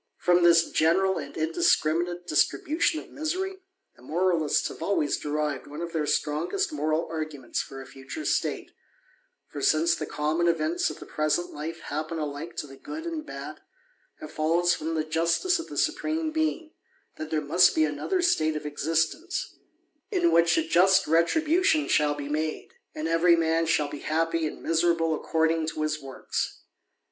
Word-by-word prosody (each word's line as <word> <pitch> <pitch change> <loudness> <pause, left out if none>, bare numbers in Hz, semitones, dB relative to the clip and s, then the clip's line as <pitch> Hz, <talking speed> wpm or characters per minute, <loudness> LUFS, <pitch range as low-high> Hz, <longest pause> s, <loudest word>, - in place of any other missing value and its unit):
."^Xom 180 0 +5
this 170 -1 +5
general 190 +4 +2
and 140 -2 -8
indiscriminate 165 +2 +1
distribution 310 - +1
of - - -13
^'^^ry, 375 +5 -3 0.4
the - - -21
moralists 165 +2 +1
have - - -11
always 165 -5 +1
derived 150 -2 -2
one 150 +2 -8
of 170 - -6
their 155 -2 0
^tigest 160 - -1
moral 155 - -1
arguments 155 -6 -3
for 135 - -9
a 135 - -9
future 135 - -8
state; - - -1 0.8
for - - -7
since 340 +1 +3
the - - -4
^^^^^mon 155 +3 0
events 165 0 0
of 155 - -7
the - - -10
present 155 +3 -1
life 165 +2 -6
happen 155 +3 -4
alike 150 +2 -5
to - - -4
the 135 -1 -13
good 315 - -7
^'^^ 330 -2 -4
bad, - - -8 0.6
it 155 - -8
follows 170 +3 +2
from 160 +1 -3
the 155 - 0
justice 170 - +1
of 330 - -6
the - - -8
Supreme 315 -1 0
Being, 315 0 -1 0.5
^^ 155 0 -5
there 160 -1 0
must 175 +5 +4
be 155 - +4
another 155 - -1
state 155 - +2
of 150 - -4
existence^ 165 - -1 0.6
in 355 -5 +2
which 170 - +4
a 325 - +2
just 190 - +5
26o - - -10
THE - - -6
ADVENTURER. - - +3 0.3
retribution 320 -1 +2
shall 150 -1 +2
be 145 -1 -6
made, 155 +1 -3 0.3
and 155 +1 -3
every 165 +1 +4
man 165 0 +1
shall 160 -3 +2
be 145 0 -7
happy 165 +1 0
and - - -9
miserable 165 0 +2
according 160 +1 0
to 155 -1 -3
his 155 0 -2
works. 135 -1 -4
165 Hz, 175 wpm, -27 LUFS, 155-185 Hz, 0.8 s, ^Xom